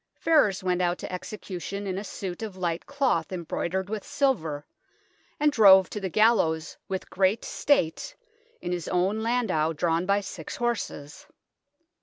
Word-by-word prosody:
Ferrers 280 - +3
went 180 -1 +1
out 175 0 +1
to - - -7
execution 200 +1 -6
in 190 -1 -2
a - - -6
suit 190 -2 -6
of 210 -4 -6
light 170 -2 -2
cloth 265 - 0
embroidered 185 +1 -3
with 215 0 -4
silver, 200 - -1 0.7
and 300 0 +4
drove 190 -7 +7
to 210 - -4
the 190 -2 -3
gallows 190 -7 +2
with 190 -1 -5
great 195 +4 +1
state, 285 - 0 0.5
in 175 - -4
his 175 -2 -3
own 190 +5 +1
landau 220 -10 +1
drawn 165 +2 0
by 200 +1 +3
six 185 -5 -7
horses. 225 -11 -4
190 Hz, 150 wpm, -26 LUFS, 175-220 Hz, 0.7 s, drove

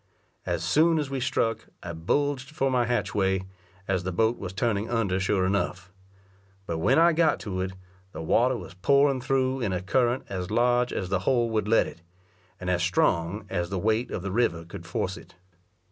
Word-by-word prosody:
As - - -1
soon 165 +2 +3
as 145 -3 -2
we 135 - -2
struck, 125 -3 -1 0.2
I 85 - -5
bulged 130 - -1
for 135 -3 0
my 125 -2 +2
hatchway, 95 -5 0 0.4
as 95 -2 +1
the 95 +1 -3
boat 110 +6 +1
was 90 - -5
turning 105 +1 -1
under 105 -6 0
sure 95 -1 +1
enough. 90 -1 -1 0.7
But 85 -2 -3
when 130 +11 +3
I 170 +1 +6
got 160 -1 +3
to 95 -5 -3
it, 95 0 -3 0.4
the 80 -1 -7
water 125 +9 +2
was - - -9
pouring 140 +7 +3
thro' 130 0 0
in 115 -6 -1
a 90 - -1
current 120 +5 +1
as 90 -2 -4
large 120 +2 +2
as 95 - -3
the 95 -1 +1
hole 120 +3 +1
would 110 -2 0
let 115 +1 +4
it, 85 - -10 0.6
and 90 - -6
as 90 -1 +1
strong 90 +2 +1
as 90 -2 -2
the 95 - -2
weight 110 +5 0
of 90 - -4
the 100 - -3
river 95 -7 0
could 85 0 -10
force 90 +2 -2
it. - - -15
105 Hz, 195 wpm, -26 LUFS, 95-125 Hz, 0.7 s, I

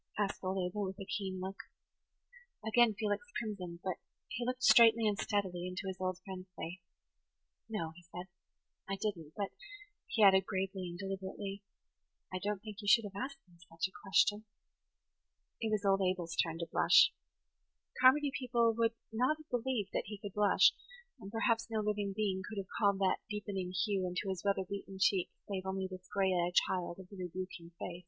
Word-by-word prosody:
asked 205 -2 -1
old 190 +1 -1
Abel, 185 +3 -1
with 190 0 -6
a 195 - -5
keen 190 -2 -3
look. 190 +1 -5 1.1
Again 220 0 +4
Felix 205 +1 -1
crimsoned; 185 -6 -5
but 185 -2 -2 0.3
he 235 +2 -3
looked 255 +1 -2
straightly 230 -1 +7
and 210 - +2
steadily 185 -4 -1
into 180 +2 -4
his 190 -1 -3
old 185 -1 -1
friend's 190 -1 -7
face. 170 +4 -5 0.9
"No," 170 -7 -2
he 175 - -13
said, 180 +1 -6 0.6
"I 195 - 0
didn't; 195 -7 -3
but," 200 -2 -2 0.6
he 220 - +2
added, 190 -1 +7
gravely 190 -1 -2
and 175 - -7
deliberately, 195 +1 -5 0.7
"I 185 - -1
don't 205 +1 -2
think 215 -2 -8
you 205 - -7
should 230 +3 +7
have 200 -1 -8
asked 270 +6 -4
me 175 -1 -21
such 165 +1 -1
a - - -19
question." 205 +2 +3 1.2
It 225 - 0
was 215 -2 0
old 195 0 +4
Abel's 180 -3 0
turn 165 -1 +1
to 170 0 -4
blush. - - +6 0.9
Carmody 280 +2 +6
people 235 -3 +2
would 230 0 +2 0.2
not 255 +7 +2
have 310 0 -17
believed 245 -4 -1
he 210 +1 -6
could 200 -1 -7
blush; 210 -1 +5 0.5
and 195 - -9
perhaps 230 0 +1
no 220 -1 0
living 210 -1 0
being 195 -3 0
could 210 - -7
have 195 -2 -5
called 200 -3 +3
that 190 - +3
deep 210 0 -4
[Page 205 - -4
84] 190 - -1
ening 185 - -5
hue 195 -4 0
into 185 +2 -2
his 190 -2 -3
weather 195 -2 +1
beaten 195 0 -6
cheek 190 -2 +3 0.2
save 190 -2 -3
only 190 0 -1
this 185 0 -10
gray 190 -1 +2
eyed 175 0 0
child 175 -2 +1
of 190 -1 -11
the 200 - -11
rebuking 180 -1 -6
face. 175 -3 -5
195 Hz, 190 wpm, -34 LUFS, 185-215 Hz, 1.2 s, straightly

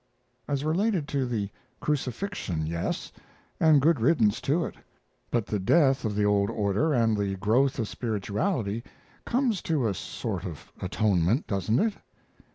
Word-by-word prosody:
"As 140 -1 -1
related 175 0 +1
to 135 -3 0
the 105 -5 -2 0.3
crucifixion, 135 - -2
yes, 85 +2 -3 0.5
and 155 -3 +6
good 155 +1 +3
riddance 115 -5 +3
to 165 +5 +1
it; - - -6 0.6
but 120 -3 0
the 105 - -2
death 135 - +3
of 105 -2 -1
the 105 0 +2
old 100 0 +3
order 105 +7 +1
and 115 -5 +3
the 100 -1 -1
growth 125 - +2
of 115 -4 -1
spirituality 110 - -2 0.4
comes 240 -6 +1
to 150 -8 0
a 100 - 0
sort - - -4
of - - -8
atonement, 105 - +1
doesn't 100 +3 0
it?" 220 +7 +2
120 Hz, 150 wpm, -27 LUFS, 105-150 Hz, 0.6 s, and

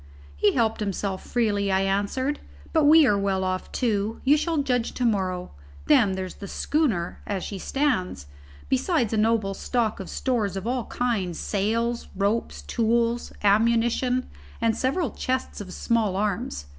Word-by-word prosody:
"He 70 - +3
helped 225 -3 +1
himself 195 -2 -2
freely," 205 -4 0
I 190 0 +3
answered, 205 +9 0 0.3
"but 315 -3 +4
we 310 +1 +8
are 205 -5 +3
well 195 -1 0
off 185 0 -2
too. 220 -3 -1
You 280 +3 +5
shall 325 +2 0
judge 245 -3 0
to 250 - -1
morrow. 185 -5 -1 0.3
Then 195 - +4
there's 185 -1 -5
the 200 - -5
schooner 225 - -1
as 195 -3 -2
she 200 - -5
stands: 225 - -1 0.4
besides 265 - +1
a - - +1
noble 215 -2 +2
stock 225 +1 -1
of 195 - -7
stores 220 -7 -1
of 195 - -5
all 245 0 -1
kinds, 210 -9 -1
sails, 230 +4 -1
ropes, 205 +4 -1
tools, 235 +1 0
ammunition 235 +4 +2 0.3
and 230 -1 +2
several 275 - 0
chests 255 -4 -3
of 185 -2 -8
small 220 -2 0
arms. 190 - -2
220 Hz, 155 wpm, -25 LUFS, 195-245 Hz, 0.4 s, we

